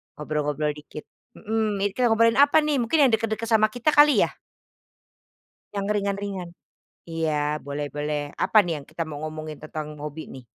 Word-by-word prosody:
ngobrol-ngobrol 150 Hz, 0 st, -2 dB
dikit. 150 Hz, +1 st, -9 dB, 0.3 s
Mhm, 215 Hz, -2 st, -2 dB
ini 205 Hz, -, +2 dB
kita 250 Hz, -1 st, +3 dB
ngobrolin 230 Hz, +1 st, +4 dB
apa 285 Hz, +2 st, +6 dB
nih? 300 Hz, -2 st, +1 dB
Mungkin 245 Hz, +6 st, +1 dB
yang -, -, -1 dB
deket-deket 225 Hz, 0 st, -1 dB
sama 220 Hz, -1 st, +5 dB
kita 245 Hz, +5 st, +1 dB
kali 295 Hz, -1 st, +6 dB
ya? -, -, 0 dB, 1.5 s
Yang 200 Hz, -1 st, -1 dB
ringan-ringan? 200 Hz, -3 st, -3 dB, 0.6 s
Iya 155 Hz, -2 st, -1 dB
boleh 145 Hz, +1 st, -4 dB
boleh 150 Hz, 0 st, -3 dB
apa 220 Hz, -, +4 dB
nih 175 Hz, -, -2 dB
yang 140 Hz, -, -15 dB
kita 160 Hz, +2 st, -4 dB
mau 150 Hz, -2 st, -7 dB
ngomongin 155 Hz, -1 st, -6 dB
tentang 150 Hz, -1 st, -7 dB
hobi 150 Hz, +1 st, -6 dB
nih? 130 Hz, -2 st, -10 dB
165 Hz, 165 wpm, -25 LUFS, 150-225 Hz, 1.5 s, apa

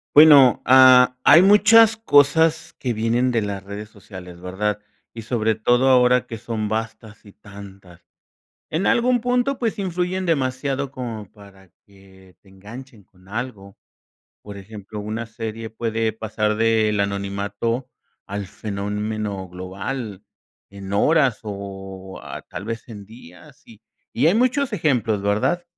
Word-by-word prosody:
Bueno, 145 Hz, -4 st, +7 dB
ah, 130 Hz, -1 st, +7 dB
hay 170 Hz, -, +7 dB
muchas 210 Hz, +3 st, +6 dB
cosas 160 Hz, -4 st, +2 dB
que 125 Hz, -, -3 dB
vienen 115 Hz, +3 st, 0 dB
de 115 Hz, -, 0 dB
las 100 Hz, -2 st, -5 dB
redes 100 Hz, +2 st, -8 dB
sociales, 90 Hz, -5 st, -12 dB
¿verdad? 100 Hz, +3 st, -3 dB, 0.3 s
Y 115 Hz, -, -8 dB
sobre 110 Hz, -1 st, -1 dB
todo 120 Hz, +4 st, +2 dB
ahora 125 Hz, -1 st, +4 dB
que 115 Hz, -, -7 dB
son 110 Hz, -1 st, -4 dB
vastas 110 Hz, 0 st, -6 dB
y 100 Hz, -, -15 dB
tantas. 100 Hz, -3 st, -14 dB, 0.7 s
En 165 Hz, +5 st, -2 dB
algún 245 Hz, 0 st, +2 dB
punto, 250 Hz, +2 st, 0 dB
pues 225 Hz, -4 st, -2 dB
influyen 185 Hz, 0 st, -2 dB
demasiado 135 Hz, -2 st, -1 dB
como 115 Hz, -6 st, -7 dB
para 100 Hz, -3 st, -18 dB, 0.2 s
que, 95 Hz, -2 st, -20 dB
te 100 Hz, -, -21 dB
enganchen 110 Hz, +4 st, -12 dB
con 95 Hz, 0 st, -25 dB
algo. 105 Hz, -4 st, -7 dB, 0.6 s
Por 105 Hz, -1 st, -11 dB
ejemplo, 105 Hz, +1 st, -9 dB
una 110 Hz, +2 st, -5 dB
serie 115 Hz, 0 st, -7 dB
puede 110 Hz, 0 st, -2 dB
pasar 110 Hz, -1 st, -2 dB
del 110 Hz, -1 st, +1 dB
anonimato 100 Hz, +4 st, -3 dB, 0.4 s
al 100 Hz, 0 st, -5 dB
fenómeno 105 Hz, 0 st, -5 dB
global 95 Hz, +4 st, -6 dB, 0.5 s
en 100 Hz, -1 st, -9 dB
horas 135 Hz, +2 st, +2 dB
o 95 Hz, -2 st, -8 dB
ah, -, -, -8 dB
tal -, -, -8 dB
vez 115 Hz, +1 st, -6 dB
en 105 Hz, -3 st, -10 dB
días 95 Hz, -5 st, -16 dB
y 110 Hz, -2 st, -17 dB, 0.3 s
y 130 Hz, -, +2 dB
hay 170 Hz, -, +4 dB
muchos 250 Hz, +1 st, +1 dB
ejemplos, 120 Hz, -, 0 dB
¿verdad? 125 Hz, -, 0 dB
110 Hz, 135 wpm, -21 LUFS, 100-130 Hz, 0.7 s, Bueno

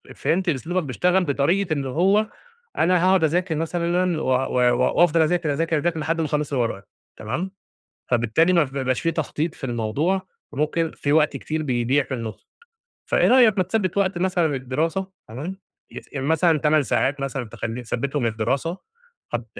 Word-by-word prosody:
فهمت 185 Hz, +2 st, 0 dB
أسلوبك 170 Hz, +5 st, -1 dB
بيشتغل 180 Hz, +7 st, +1 dB
بطريقة 160 Hz, +5 st, +1 dB
اللي 140 Hz, -3 st, -2 dB
هو 195 Hz, -, +2 dB, 0.5 s
أنا 180 Hz, +1 st, +3 dB
هاقعد 185 Hz, -2 st, +4 dB
أذاكر 170 Hz, +2 st, +1 dB
مثلًا 170 Hz, +1 st, 0 dB
و -, -, -3 dB
و 125 Hz, -1 st, +2 dB, 0.2 s
وأفضل 170 Hz, -1 st, +5 dB
أذاكر، 160 Hz, -1 st, +1 dB
أذاكر، 165 Hz, +2 st, 0 dB
أذاكر 165 Hz, +2 st, -1 dB
لحد 165 Hz, +2 st, -1 dB
ما -, -, 0 dB
أخلص 150 Hz, -1 st, -2 dB
اللي 125 Hz, -3 st, +2 dB
ورايا، 100 Hz, -3 st, -5 dB, 0.4 s
تمام؟ 135 Hz, -, -3 dB, 0.6 s
فبالتالي 120 Hz, +9 st, +3 dB
مف 175 Hz, -, +3 dB
ما 140 Hz, -, -4 dB
بيبقاش 130 Hz, -1 st, 0 dB
في 165 Hz, -, +1 dB
تخطيط 160 Hz, 0 st, -2 dB
في -, -, -9 dB
الموضوع، 135 Hz, -, -1 dB, 0.3 s
وممكن 155 Hz, +3 st, 0 dB
في 145 Hz, -, -1 dB
وقت 150 Hz, -2 st, +3 dB
كتير 155 Hz, +3 st, -3 dB
بيضيع 130 Hz, 0 st, +1 dB
في 130 Hz, -, -5 dB
النص، 115 Hz, -4 st, -7 dB, 0.6 s
فإيه -, -, +2 dB
رأيك 240 Hz, -5 st, +5 dB
ما 185 Hz, -, +3 dB
تثبت 190 Hz, -1 st, -1 dB
وقت 190 Hz, -2 st, +1 dB
مثلًا 180 Hz, -2 st, +1 dB
للدراسة، 150 Hz, +7 st, -2 dB, 0.2 s
تمام، 150 Hz, +12 st, -6 dB, 0.3 s
يس -, -, -10 dB
مثلًا 160 Hz, +3 st, +2 dB
8 150 Hz, 0 st, +3 dB
ساعات 140 Hz, +4 st, 0 dB
مثلًا 135 Hz, -2 st, -3 dB
تخلي 115 Hz, +2 st, -5 dB
تثبتهم 135 Hz, +3 st, -2 dB
للدراسة، 125 Hz, -, -1 dB, 0.6 s
هت -, -, -2 dB
155 Hz, 165 wpm, -23 LUFS, 135-175 Hz, 0.6 s, وأفضل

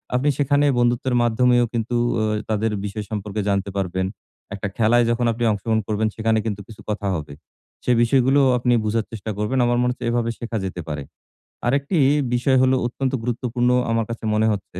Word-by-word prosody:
আপনি 135 Hz, +4 st, +2 dB
সেখানে 145 Hz, 0 st, +2 dB
বন্ধুত্বের 120 Hz, +1 st, +1 dB
মাধ্যমেও 120 Hz, +1 st, +3 dB
কিন্তু 115 Hz, +1 st, -2 dB, 0.2 s
ওয় 110 Hz, -1 st, 0 dB
তাদের 110 Hz, +1 st, 0 dB
বিষয় 105 Hz, +1 st, -5 dB
সম্পর্কে 105 Hz, 0 st, -3 dB
জানতে 100 Hz, 0 st, 0 dB
পারবেন। 95 Hz, -1 st, -1 dB, 0.5 s
একটা 100 Hz, +1 st, -4 dB
খেলায় 120 Hz, +1 st, +4 dB
যখন 120 Hz, +1 st, +1 dB
আপনি 115 Hz, +1 st, -3 dB
অংশগ্রহণ 110 Hz, +2 st, 0 dB
করবেন 110 Hz, 0 st, 0 dB
সেখানে 110 Hz, 0 st, +1 dB
কিন্তু 105 Hz, -2 st, -3 dB
কিছু 110 Hz, -, -13 dB
কথা 105 Hz, -1 st, -2 dB
হবে। 75 Hz, -3 st, -6 dB, 0.5 s
সে -, -, +1 dB
বিষয়গুলোও 135 Hz, +3 st, +3 dB
আপনি 120 Hz, 0 st, +1 dB
বোঝার 110 Hz, +1 st, 0 dB
চেষ্টা 110 Hz, 0 st, -5 dB
করবেন। 105 Hz, +6 st, 0 dB
আমার 120 Hz, 0 st, +2 dB
মনে 125 Hz, 0 st, +2 dB
হচ্ছে 125 Hz, -, -7 dB
এভাবে 120 Hz, -1 st, 0 dB
শেখা 115 Hz, -1 st, -3 dB
যেতে 90 Hz, -2 st, -5 dB
পারে। 75 Hz, -2 st, -4 dB, 0.6 s
আরেকটি 140 Hz, +7 st, +1 dB, 0.4 s
বিষয় 130 Hz, +2 st, +2 dB
হলো 130 Hz, 0 st, +4 dB
অত্যন্ত 130 Hz, +2 st, -3 dB
গুরুত্বপূর্ণ 120 Hz, 0 st, -1 dB, 0.2 s
আমার 115 Hz, -1 st, +1 dB
কাছে 115 Hz, -1 st, -6 dB
মনে 110 Hz, +1 st, +2 dB
হচ্ছে, 95 Hz, -3 st, -5 dB
115 Hz, 180 wpm, -22 LUFS, 105-125 Hz, 0.6 s, খেলায়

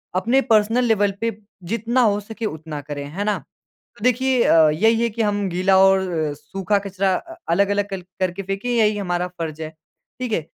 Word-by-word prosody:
अपने 235 Hz, +9 st, +2 dB
personal 220 Hz, +3 st, +4 dB
level 205 Hz, -3 st, +2 dB
पे 230 Hz, -2 st, -1 dB, 0.3 s
जितना 235 Hz, +3 st, +1 dB
हो 205 Hz, -3 st, +3 dB
सके 220 Hz, +2 st, -7 dB
उतना 155 Hz, -5 st, -5 dB
करे, 145 Hz, 0 st, -6 dB
है 155 Hz, +8 st, -5 dB
ना? 210 Hz, -1 st, 0 dB, 0.6 s
तो 205 Hz, -, -8 dB
देखिए 255 Hz, 0 st, +2 dB
अ, 160 Hz, -1 st, +6 dB
यही 225 Hz, +9 st, +2 dB
है 235 Hz, -, +2 dB
कि 225 Hz, +2 st, -2 dB
हम 205 Hz, -2 st, 0 dB
गीला 185 Hz, +2 st, +2 dB
और 190 Hz, 0 st, +5 dB, 0.3 s
सूखा 195 Hz, +7 st, -1 dB
कचरा 195 Hz, -1 st, -1 dB
अ, 335 Hz, -, -6 dB
अलग-अलग 200 Hz, +3 st, +1 dB
कल 195 Hz, -2 st, -5 dB, 0.2 s
करके 185 Hz, +1 st, -1 dB
फेंके, 195 Hz, +4 st, -4 dB
यही 215 Hz, -2 st, +3 dB
हमारा 180 Hz, -2 st, -1 dB
फर्ज 160 Hz, -2 st, -5 dB
है, 155 Hz, -1 st, -5 dB, 0.5 s
ठीक 250 Hz, -3 st, -3 dB
है। 210 Hz, -, +1 dB
200 Hz, 190 wpm, -21 LUFS, 180-225 Hz, 0.6 s, अ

